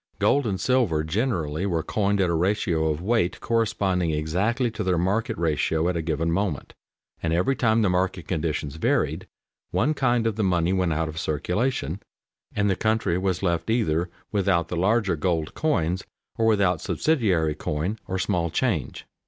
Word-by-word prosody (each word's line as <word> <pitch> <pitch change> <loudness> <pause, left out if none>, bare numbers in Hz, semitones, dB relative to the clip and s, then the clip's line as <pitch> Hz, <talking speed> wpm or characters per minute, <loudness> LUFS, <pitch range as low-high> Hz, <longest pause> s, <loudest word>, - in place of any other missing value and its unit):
Gold 140 -3 +2
and 95 -3 -2
silver 105 -9 +2
generally 85 - -1
were 85 -4 0
coined 100 -1 0
at 90 - +2
a - - +1
ratio 85 -2 +1
of 80 +2 -2
weight 105 -4 +1
corresponding 100 -6 0
exactly 95 - 0
to 110 - -4
their 90 -2 +1
market 95 +6 0
ratio 80 0 +1
at 90 - 0
a 85 - 0
given 80 +1 -1
moment, 95 -4 -2 0.5
and 80 - -1
every 90 +11 +2
time 115 -2 +2
the 100 - +3
market 90 -3 -1
conditions 75 -3 -2
varied, - - 0 0.4
one 155 - +1
kind 120 -5 +1
of 110 -2 0
the 110 - +1
money 90 -1 +2
went 90 -3 +1
out 80 +1 0
of 80 +1 -5
circulation, 90 - -1 0.5
and 105 0 +2
the 95 - +2
country 110 -5 +1
was 95 -1 -1
left 85 -1 0
either 90 -7 +1 0.2
without 95 -5 +1
the - - -3
larger 100 +1 +2
gold 80 -1 -1
coins, 95 - 0 0.3
or 115 - +1
without 100 -6 +2
subsidiary 95 - +1
coin, 80 +8 -3
or 95 - -2
"small 85 -2 0
change." - - -1
90 Hz, 170 wpm, -25 LUFS, 80-110 Hz, 0.5 s, the